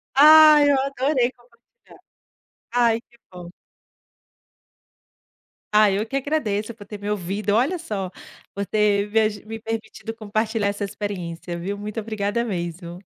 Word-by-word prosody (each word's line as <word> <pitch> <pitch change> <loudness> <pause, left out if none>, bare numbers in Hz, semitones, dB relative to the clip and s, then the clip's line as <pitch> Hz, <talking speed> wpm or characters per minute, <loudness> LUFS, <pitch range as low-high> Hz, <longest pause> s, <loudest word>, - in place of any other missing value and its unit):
Ai, 305 0 +8
eu 275 - +3
adorei 270 -2 0
compartilhar. 240 - -23 0.7
Ai, 235 -2 +2
que 235 - -27
bom. 180 -1 -10 2.2
Ah, 210 -1 +5
eu 200 +3 -1
que 270 - -4
agradeço 235 -7 -1
por 205 -3 -13
ter 210 - -8
me 205 +1 -4
ouvido, 205 +1 -2
olha 270 +11 +1
só, 200 - -4 0.4
por 200 - -2
ter 205 0 +1
me 225 - +3
aju 215 -1 -1
me 225 0 -7
permitido 225 0 -6
compartilhar 215 -1 -1
essa 200 0 -4
experiência, 180 -4 -5
viu, 195 +4 -4
muito 210 +2 -5
obrigada 215 +1 -2
mesmo. 175 -4 -5
215 Hz, 135 wpm, -23 LUFS, 200-240 Hz, 2.2 s, Ai